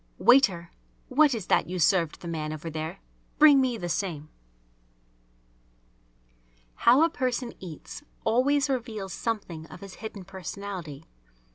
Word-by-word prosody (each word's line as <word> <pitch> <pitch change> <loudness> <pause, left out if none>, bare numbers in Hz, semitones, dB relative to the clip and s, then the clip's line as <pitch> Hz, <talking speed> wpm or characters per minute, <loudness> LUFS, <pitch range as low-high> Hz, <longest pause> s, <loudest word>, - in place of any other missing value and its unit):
"Waiter, 190 -11 +4 0.4
what 280 0 +4
is 215 -5 -5
that - - +2
you 185 - -3
served 170 -1 +2
the 175 - -7
man 155 -2 -3
over 155 +1 -6
there? 155 - -5 0.4
Bring 290 -3 +7
me 250 -3 0
the 175 - -4
same!" 165 -4 -3 2.4
How 255 +6 +5
a 330 - +4
person 250 -2 -2
eats 170 - -9 0.2
always 275 +6 +2
reveals 225 -8 -3
something 185 -8 -4
of - - -12
his 195 -2 -9
hidden 215 -3 -7
personality. 185 -5 -7
195 Hz, 130 wpm, -27 LUFS, 170-250 Hz, 2.4 s, Bring